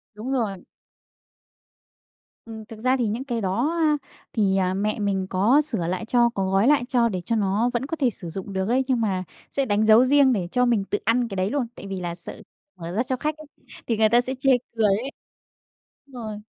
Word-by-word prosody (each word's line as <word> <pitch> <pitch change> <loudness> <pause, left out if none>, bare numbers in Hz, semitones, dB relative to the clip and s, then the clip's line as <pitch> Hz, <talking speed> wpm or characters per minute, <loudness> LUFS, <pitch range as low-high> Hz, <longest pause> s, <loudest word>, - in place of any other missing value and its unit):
Đúng 230 +6 -5
rồi. 210 -8 -2 1.8
Ừm, 220 -1 -9
thực 220 0 -11
ra 255 +3 +2
thì 240 -3 0
những 225 +5 -2
cái 240 -4 -3
đó, 240 - 0
a, 305 -2 +3 0.4
thì, 195 -4 +2
ờ, 185 -1 +1
mẹ 210 +3 -1
mình 195 -2 -1
có 215 +10 +4
sửa 225 - -3
lại 185 +5 -2
cho, 240 +1 +3
có 195 -4 -2
gói 195 +4 +3
lại 290 -3 +4
cho 240 -3 +3
để 185 -4 -3
cho 230 - 0
nó 210 +3 +1
vẫn 240 +2 -1
có 325 - -3
thể 270 -5 +2
sử 180 -6 -9
dụng 195 +4 -7
được 190 0 -1
ấy. 255 +3 +2
Nhưng 255 -3 +1
mà 190 -4 0 0.3
sẽ 275 - -1
đánh 210 -2 +1
dấu 220 +3 +7
riêng 275 -1 +5
để 185 -6 -1
cho 250 0 +2
mình 235 -5 +2
tự 205 - -2
ăn 235 +2 +2
cái 200 - -6
đấy 185 +1 0
luôn, 270 -2 -1
tại - - -9
vì 195 -1 -4
là 175 -1 -4
sợ 170 - -10 0.3
mở 170 -1 -7
ra 215 +7 0
cho 260 0 -2
khách 305 +3 -2
ấy 310 - -11 0.4
thì 230 - 0
người 220 0 +4
ta 240 +2 +5
sẽ 255 +1 -3
chê 270 0 +3 0.2
cười 225 -1 +2
ấy. 210 +7 +1 1.0
Rồi. 230 -6 -7
225 Hz, 230 wpm, -24 LUFS, 195-255 Hz, 1.8 s, dấu